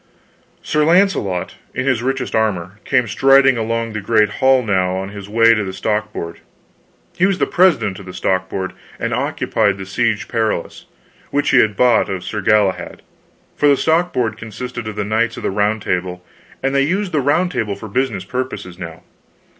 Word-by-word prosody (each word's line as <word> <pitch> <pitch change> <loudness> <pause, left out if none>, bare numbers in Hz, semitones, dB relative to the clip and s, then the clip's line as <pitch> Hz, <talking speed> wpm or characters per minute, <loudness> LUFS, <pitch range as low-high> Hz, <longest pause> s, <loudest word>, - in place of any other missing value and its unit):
Sir 150 0 +1
Launcelot, 165 - +1 0.2
in 130 - -1
his 130 -4 +1
richest 130 0 -2
armor, 100 -3 -1
came 125 -3 +2
striding 135 +3 +5
along 115 0 -2
the 105 - -3
great 105 0 +3
hall 130 -1 +4
now 95 -4 +1
on 95 +1 -4
his 100 -1 -9
way 115 +1 +5
to 105 -2 0
the 95 -1 -5
stock 105 +2 -2
board; 85 -5 -6 0.8
he 185 - +3
was 195 -2 0
president 175 - +2
of 95 - -12
the - - -6
stock 95 0 0
board, 95 -1 -4 0.3
and - - -2
occupied 100 -1 0
the 95 - -7
Siege 105 +2 -1
Perilous, 110 -7 -2 0.4
which 145 +1 0
he 135 - +6
had 110 -3 +3
bought 125 -2 +3
of 95 -2 -4
Sir 105 - -4
Galahad; 100 -1 +1 0.5
for 145 - +2
the 140 -1 +5
stock 170 +4 +2
board 120 -3 -1
consisted 115 +1 -7
of 110 - -5
the 105 -1 -2
Knights 115 +2 0
of - - -7
the - - 0
Round 105 +2 0
Table, 90 0 -3 0.4
and 135 0 0
they 140 - +3
used 185 +7 0
the 150 -3 +1
Round 175 +7 +1
Table 110 - -2
for 110 +3 -9
business 130 +5 -1
purposes 125 -8 -5
now. 80 -2 -8
110 Hz, 185 wpm, -18 LUFS, 100-135 Hz, 0.8 s, he